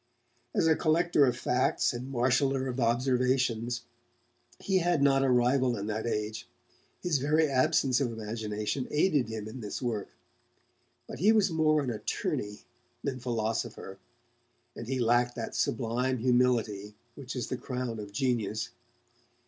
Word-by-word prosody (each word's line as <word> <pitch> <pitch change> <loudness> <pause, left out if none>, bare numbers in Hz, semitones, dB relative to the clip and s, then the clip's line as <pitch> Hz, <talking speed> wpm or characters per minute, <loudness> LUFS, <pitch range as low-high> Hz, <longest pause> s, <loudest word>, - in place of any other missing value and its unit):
As - - +3
a 160 -1 +5
collector 160 -2 +3
of 125 -1 0
facts 130 +1 +1
and 125 +3 -6
marshaller 130 +2 +1
of 130 0 -3
observations, 125 -1 +1 0.7
he 190 -1 +1
had 175 -4 +2
not 135 -1 +4
a 135 - +2
rival 125 0 +3
in 100 - -4
that 110 +2 -3
age; 105 -1 -3 0.6
his 165 -6 +1
very 155 +3 +2
absence 135 -1 +2
of 125 -4 0
imagination 110 +2 -3
aided 150 -4 +2
him 110 -1 -5
in 110 +4 -8
this 105 -3 -5
work. 110 -6 -2 1.0
But - - -9
he 205 +6 +5
was 210 -4 +3
more 155 -2 +3
an 130 - -2
attorney 105 -1 -3 0.4
than 135 -2 -2
philosopher, 115 -4 -3 0.8
and 115 - -7
he 135 +1 -1
lacked 120 +1 +2
that 115 - -5
sublime 125 +2 0
humility 115 -4 +1 0.2
which 135 -1 -8
is 125 - -3
the - - -1
crown 125 -3 -4
of 105 -1 -7
genius. 110 -2 -1
125 Hz, 145 wpm, -29 LUFS, 115-135 Hz, 1.0 s, a